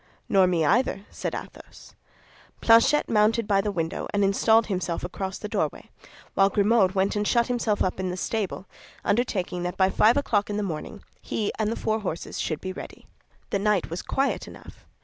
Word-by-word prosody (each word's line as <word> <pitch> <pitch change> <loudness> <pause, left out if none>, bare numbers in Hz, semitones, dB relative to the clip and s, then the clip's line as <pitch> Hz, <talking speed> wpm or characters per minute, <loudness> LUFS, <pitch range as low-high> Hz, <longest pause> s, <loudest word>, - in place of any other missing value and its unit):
"Nor 190 -2 +4
me 170 -3 +1
either," 205 - +1
said - - -4
Athos. - - -11 0.7
Planchet 230 +6 +5
mounted 215 +1 +2
by 200 -2 +3
the 205 +1 -2
window 165 -2 -3
and 205 0 +1
installed 220 +3 +4
himself 185 -4 -3
across 190 +2 -4
the - - -6
doorway, - - -3 0.4
while 195 0 +4
Grimaud 200 -1 +3
went 195 +2 +1
and 205 0 0
shut 235 -1 +3
himself 235 -4 0
up 185 - -2
in 185 -1 -2
the 180 - -4
stable, 200 -1 -3 0.4
undertaking 200 -5 0
that 180 0 -4
by 190 0 +3
five 225 +4 +4
o'clock 215 -8 +1
in 205 - -2
the 210 - -1
morning 195 +4 -6 0.2
he 210 -2 -2
and 215 0 +1
the - - -2
four 220 0 -1
horses 180 -5 -5
should 155 - -3
be 185 0 -4
ready. - - -10 0.5
The 200 - +1
night 200 -4 +1
was 170 - -3
quiet 275 +1 -1
enough. - - -14
200 Hz, 190 wpm, -25 LUFS, 185-220 Hz, 0.7 s, Planchet